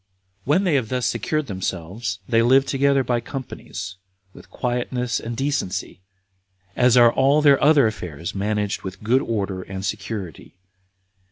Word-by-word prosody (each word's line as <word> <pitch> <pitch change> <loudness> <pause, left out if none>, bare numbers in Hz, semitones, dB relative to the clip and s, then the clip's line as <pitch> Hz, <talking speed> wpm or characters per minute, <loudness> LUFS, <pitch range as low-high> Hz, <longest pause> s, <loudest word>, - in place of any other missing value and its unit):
3. - - -11
When 180 +7 +4
they 180 -5 +1
have 130 -6 +1
thus 125 -1 -1
secured 150 +7 -1
themselves, 95 0 -4
they 115 -2 +3
live 130 +3 +5
together 140 0 +2
by 120 -1 0
companies, 120 -7 -7 0.4
with - - -15
quietness 125 -1 -2
and 115 0 -6
decency, 120 -11 -2 0.7
as 125 0 +4
are 120 -1 +7
all 140 +3 +3
their 140 -2 +5
other 145 -3 +6
affairs 90 -4 -4
managed 105 0 -1
with 95 +2 -8
good 125 +5 +3
order 100 -4 -2
and 95 +1 -6
security. 100 - -5
115 Hz, 150 wpm, -22 LUFS, 100-135 Hz, 0.7 s, are